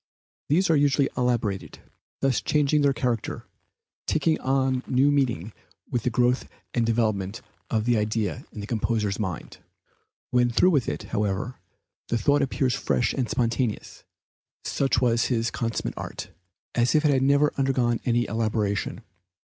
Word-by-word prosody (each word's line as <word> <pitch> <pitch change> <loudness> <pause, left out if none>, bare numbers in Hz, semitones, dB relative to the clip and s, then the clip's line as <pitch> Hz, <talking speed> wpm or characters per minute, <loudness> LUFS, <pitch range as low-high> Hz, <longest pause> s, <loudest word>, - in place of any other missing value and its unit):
These 170 +4 +3
are - - +5
usually 140 -1 +3
elaborated, 120 -6 -1 0.4
thus 135 -4 +2
changing 150 0 +2
their 140 -1 +4
character, 120 -4 -2 0.6
taking 160 -1 +1
on 130 -1 +1
new 135 +3 +3
meaning 120 - 0 0.4
with 120 - 0
the 125 - 0
growth 125 +2 +1 0.2
and 120 - +1
development 110 -2 0 0.3
of 110 -1 0
the 120 -1 +3
idea 105 -5 -1
in 105 - -7
the - - -5
composer's 110 -2 -1
mind; 95 -7 -5 0.7
when 125 0 +3
through 180 +10 +4
with 140 -7 +1
it, - - -4
however, 105 +4 -2 0.5
the 120 - 0
thought 145 +6 +2
appears 130 -1 0
fresh 125 -2 0
and 125 -5 -1
spontaneous, 115 -1 -1 0.6
such 135 -3 +1
was 115 -2 +2
his 115 -2 0
consummate 115 -1 -2
art, - - -6 0.4
as 120 +4 +2
if 155 0 +3
it 150 - +5
had 135 -2 +2
never 140 +2 +3
undergone 130 -4 +1
any 120 -1 +1
elaboration. 110 -2 -1
120 Hz, 145 wpm, -25 LUFS, 110-135 Hz, 0.7 s, are